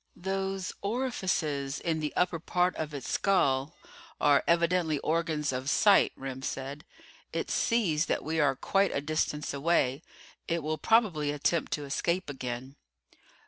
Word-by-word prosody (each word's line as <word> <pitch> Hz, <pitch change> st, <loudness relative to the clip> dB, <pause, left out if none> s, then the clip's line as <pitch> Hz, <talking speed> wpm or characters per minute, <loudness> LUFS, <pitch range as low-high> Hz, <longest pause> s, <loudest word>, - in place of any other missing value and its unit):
"Those 190 Hz, 0 st, -3 dB
orifices 185 Hz, -, -1 dB
in 160 Hz, -2 st, -1 dB
the 150 Hz, -1 st, -2 dB
upper 180 Hz, -2 st, +1 dB
portion 180 Hz, +1 st, 0 dB
of 155 Hz, -1 st, -4 dB
its 140 Hz, -2 st, -6 dB
skull 150 Hz, -7 st, +1 dB, 0.4 s
are 145 Hz, -1 st, +4 dB
evidently 170 Hz, -2 st, +2 dB
organs 155 Hz, -1 st, 0 dB
of 130 Hz, +1 st, -3 dB
sight," 205 Hz, +6 st, +5 dB
Remm 130 Hz, -1 st, -6 dB
said. 140 Hz, +5 st, -5 dB, 0.5 s
"It -, -, -3 dB
sees 170 Hz, -9 st, +1 dB
that -, -, -1 dB
we 160 Hz, +1 st, -1 dB
are 140 Hz, -3 st, +3 dB
quite 195 Hz, +7 st, +1 dB
a 140 Hz, -, 0 dB
distance 150 Hz, 0 st, -1 dB
away. 140 Hz, -2 st, +1 dB, 0.5 s
It 170 Hz, -2 st, -1 dB
will 155 Hz, 0 st, -2 dB
probably 185 Hz, -9 st, +2 dB
attempt 150 Hz, +3 st, 0 dB
to 145 Hz, -, -3 dB
escape 170 Hz, +4 st, -1 dB
again." 130 Hz, +1 st, -6 dB
155 Hz, 140 wpm, -29 LUFS, 140-180 Hz, 0.5 s, sight